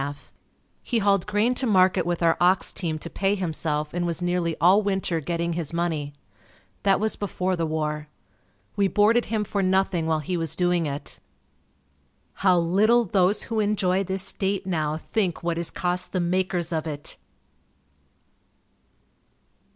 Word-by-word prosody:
He 240 - -1
hauled 200 -3 +2
grain 210 +4 +2
to 255 +1 -1
market 185 -3 +3
with 175 0 -1
our 165 -1 +4
ox 180 +1 +3
team 165 -4 -3
to 155 - -8
pay 195 +3 0
himself 155 -5 -2
and 175 0 -1
was 170 -1 -1
nearly 175 -2 -1
all 185 +5 +5
winter 190 -4 -1
getting 170 +2 -2
his 165 -2 -4
money. 160 -4 -2 0.7
That 195 -1 +3
was 220 0 0
before 185 -2 -2
the 165 -2 -1
war. 150 -1 -3 0.7
We 200 -1 +2
boarded 220 +4 +3
him 220 -2 -1
for 205 -1 -2
nothing 190 -3 +1
while 160 -1 +2
he 175 +4 -2
was 165 -3 -2
doing 175 -2 +1
it. 140 0 -6 1.1
How 185 -2 +3
little 210 +8 +3
those 195 +1 +2
who 225 -1 -2
enjoy 195 -3 +1
this 190 0 +1
state 195 0 -2
now 155 -4 -1
think 180 -1 -2
what 170 -1 -1
is 170 - -1
cost 180 0 -1
the 185 - 0
makers 180 -1 -1
of 160 0 -2
it! 145 -2 -7
180 Hz, 155 wpm, -25 LUFS, 165-195 Hz, 1.1 s, all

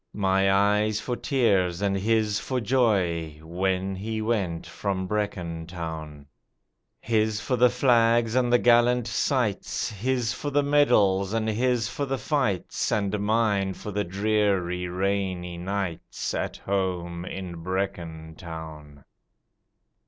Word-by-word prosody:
My 95 -1 +3
eyes 105 +2 +2
for 125 +2 -3
tears 100 -11 +1
and 100 -1 0
his 105 +1 +1
for 130 -1 -2
joy 95 - +1
When 95 +3 -1
he 110 +3 -4
went 100 -7 -1
from 95 -2 -3
Brecon 90 -5 -3
Town, 80 -4 -7 0.7
His 110 -1 +1
for 125 +4 -1
the 125 0 +5
flags 120 -2 +3
and 125 -1 +2
the 120 - +6
gallant 120 0 +4
sights 120 -3 -1
His 120 +2 -1
for 145 - -4
the 145 0 +2
medals 110 -9 +3
and 110 -1 0
his 120 0 +1
for 140 +4 -3
the 135 0 -1
fights, 130 - -1
And 105 0 0
mine 105 -3 +1
for 105 - -7
the 105 +1 -1
dreary, 95 -2 0
rainy 90 -1 -2
nights 95 -2 -3
At - - -3
home 90 -3 -2
in 90 -2 -6
Brecon 85 -3 -4
Town. 80 -4 -9
100 Hz, 130 wpm, -26 LUFS, 90-115 Hz, 0.7 s, the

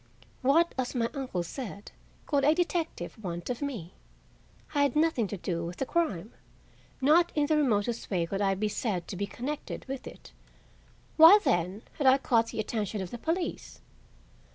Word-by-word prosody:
What, 315 +6 +3
as 255 +1 -2
my 230 -1 0
uncle 260 - -3
said, 205 +1 -7 0.3
could 285 -2 +1
a 300 +3 +5
detective 335 -9 -2
want 175 +2 -4
of 245 - -5
me? 230 - -5 0.8
I 290 - +2
had 285 -1 +2
nothing 305 -8 +2
to 205 - -5
do 170 -2 -3
with 170 +1 -6
the 270 - -1
crime; 235 - -1 0.7
not 320 +6 +4
in 295 -1 +3
the 310 - +2
remotest 235 -5 0
way 175 -4 0
could 195 +4 -3
I 195 -1 +2
be 210 +3 -1
said 200 -5 -2
to - - -5
be 200 +2 -2
connected 280 +8 -5
with 270 -1 -6
it; - - -12 0.9
why, 330 +6 +10
then, 180 - 0 0.2
had 280 - +2
I 260 +1 +7
caught 230 -4 +2
the - - -6
attention 215 -1 -2
of 185 -2 -5
the 240 - -6
police? 335 +5 -3
240 Hz, 175 wpm, -29 LUFS, 195-295 Hz, 0.9 s, why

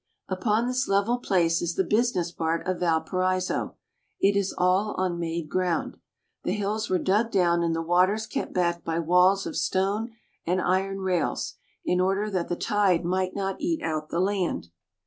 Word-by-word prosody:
Upon 210 +4 0
this 250 +1 0
level 200 +5 +2
place 170 -7 +2
is 170 0 -2
the 190 - +2
business 210 -6 +1
part 165 -1 -2
of 185 -1 -1
Valparaiso. 185 +2 0 0.4
It 200 +1 +3
is 200 -1 +1
all 185 +4 +2
on 180 -2 -1
made 165 -1 -3
ground. 180 0 -1 0.5
The - - 0
hills 210 +1 -2
were 185 - +3
dug 210 +5 +1
down 175 -4 +2
and 165 -1 0
the 165 - -2
waters 185 +6 +2
kept - - -4
back 170 -2 0
by 165 0 -2
walls 180 +4 +4
of - - -5
stone 200 +5 0 0.3
and 180 +2 0
iron 195 +2 0
rails, 180 -4 -1 0.3
in 180 0 +2
order 195 +3 0
that 180 -3 -2
the 175 - 0
tide 190 -3 +1
might 185 +1 -1
not 195 -1 -3
eat 330 +1 -1
out 155 -1 -2
the 170 - -1
land. 185 - -1
185 Hz, 175 wpm, -26 LUFS, 170-200 Hz, 0.5 s, walls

